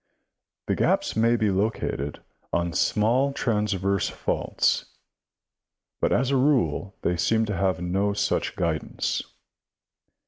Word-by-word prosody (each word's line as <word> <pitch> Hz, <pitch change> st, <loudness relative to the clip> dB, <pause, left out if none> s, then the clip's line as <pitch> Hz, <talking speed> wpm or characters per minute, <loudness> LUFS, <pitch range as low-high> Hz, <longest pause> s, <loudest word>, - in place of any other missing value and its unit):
The -, -, 0 dB
gaps -, -, +1 dB
may 115 Hz, +2 st, +3 dB
be 110 Hz, -3 st, +1 dB
located 95 Hz, -8 st, -2 dB, 0.3 s
on 85 Hz, 0 st, 0 dB
small 120 Hz, -, +2 dB
transverse 100 Hz, -6 st, 0 dB
faults, -, -, 0 dB, 1.1 s
but -, -, +1 dB
as 130 Hz, +1 st, +2 dB
a 135 Hz, -, +3 dB
rule 130 Hz, -7 st, +1 dB
they 90 Hz, -, +1 dB
seem 110 Hz, +6 st, +2 dB
to 105 Hz, -2 st, -3 dB
have 95 Hz, -4 st, 0 dB
no 100 Hz, +3 st, 0 dB
such 100 Hz, -, -1 dB
guidance. 85 Hz, -4 st, -1 dB
105 Hz, 115 wpm, -25 LUFS, 90-115 Hz, 1.1 s, may